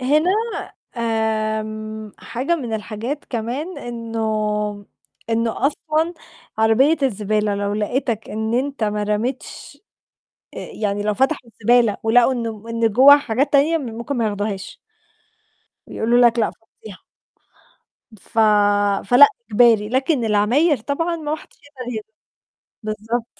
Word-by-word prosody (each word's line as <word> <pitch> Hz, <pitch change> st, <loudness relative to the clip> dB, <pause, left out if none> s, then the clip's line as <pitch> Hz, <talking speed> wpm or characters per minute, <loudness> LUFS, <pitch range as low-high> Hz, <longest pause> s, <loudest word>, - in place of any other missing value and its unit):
هنا 300 Hz, +7 st, +2 dB, 0.7 s
آمم 215 Hz, -1 st, -2 dB
حاجة 275 Hz, +8 st, -2 dB
من 245 Hz, -7 st, -5 dB
الحاجات 220 Hz, +7 st, -5 dB
كمان 255 Hz, +10 st, -4 dB
إنه 215 Hz, -3 st, -3 dB, 0.4 s
إنه 230 Hz, +3 st, 0 dB
أصلًا 315 Hz, +3 st, -1 dB, 0.4 s
عربية 235 Hz, +8 st, +4 dB
الزبالة 210 Hz, -4 st, 0 dB
لو 200 Hz, 0 st, -2 dB
لقتك 225 Hz, +1 st, -2 dB
إن 220 Hz, +2 st, -2 dB
أنت 270 Hz, -2 st, -1 dB
ما 210 Hz, 0 st, -1 dB
رميتش 215 Hz, +5 st, -4 dB, 0.8 s
آآ -, -, -7 dB
يعني 205 Hz, -1 st, -2 dB
لو 210 Hz, 0 st, 0 dB
فتحوا 265 Hz, 0 st, 0 dB
الزبالة 230 Hz, -1 st, +2 dB
ولقوا 240 Hz, +3 st, +4 dB
إنه 225 Hz, -4 st, -4 dB
إن 230 Hz, 0 st, +1 dB
جوّاها 280 Hz, +5 st, +8 dB
حاجات 275 Hz, +2 st, -1 dB
تانية، 300 Hz, +4 st, +4 dB
م 280 Hz, -, -6 dB
ممكن 240 Hz, +4 st, -4 dB
ما 235 Hz, -, 0 dB
ياخدوهاش. 205 Hz, -2 st, -4 dB, 1.1 s
بيقولوا 240 Hz, +2 st, +2 dB
لك: 235 Hz, 0 st, 0 dB
"لأ 220 Hz, -, +1 dB
فضّيها." 220 Hz, -3 st, -15 dB, 1.2 s
ف 225 Hz, -, -4 dB, 0.7 s
فلأ 245 Hz, +7 st, +8 dB, 0.2 s
إجباري، 220 Hz, -2 st, +4 dB
لكن 260 Hz, 0 st, +1 dB
العماير 235 Hz, +9 st, +3 dB
طبعًا 330 Hz, +9 st, -2 dB
ما 310 Hz, -1 st, -3 dB
حدش -, -, -16 dB
يقدر 255 Hz, -4 st, -8 dB
ي 215 Hz, -, -4 dB, 0.8 s
بالضبط. 220 Hz, +2 st, -4 dB
230 Hz, 120 wpm, -20 LUFS, 215-265 Hz, 1.2 s, جوّاها